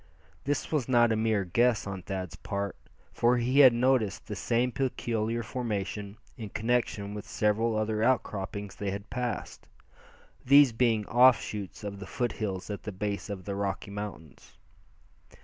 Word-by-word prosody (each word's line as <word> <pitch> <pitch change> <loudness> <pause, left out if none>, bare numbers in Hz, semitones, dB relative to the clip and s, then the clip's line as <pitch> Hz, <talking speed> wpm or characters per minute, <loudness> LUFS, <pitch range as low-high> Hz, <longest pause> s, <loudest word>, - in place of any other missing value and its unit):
This 145 0 -1
was 145 -5 0
not 120 -2 +5
a - - +2
mere 110 -3 +1
guess 115 +5 +2
on 100 -2 -5
Thad's 90 -1 -5
part, 100 +1 -4 0.4
for 120 +1 +3
he 125 +4 +2
had 130 -3 +10
noticed 120 -4 +1
the 105 - -5
same 120 +6 0
peculiar 115 -3 -1
formation 105 -3 -4 0.2
in 110 -4 -7
connection 110 -2 -1
with 105 +2 -7
several 110 +1 +1
other 110 0 -1
outcroppings 105 -5 -1
they 100 - -4
had 100 +2 -6
passed, 125 -3 -4 0.8
these 140 0 +7
being 110 -2 +2
off 125 +2 +6
shoots 105 -1 -6
of 100 -1 -5
the 100 - -8
foothills 105 -5 -3
at 100 - -5
the 105 - -5
base 100 +2 -4
of 95 -3 -6
the 100 - -3
Rocky 100 0 -3
Mountains. 100 -7 -8
110 Hz, 155 wpm, -29 LUFS, 100-120 Hz, 0.8 s, had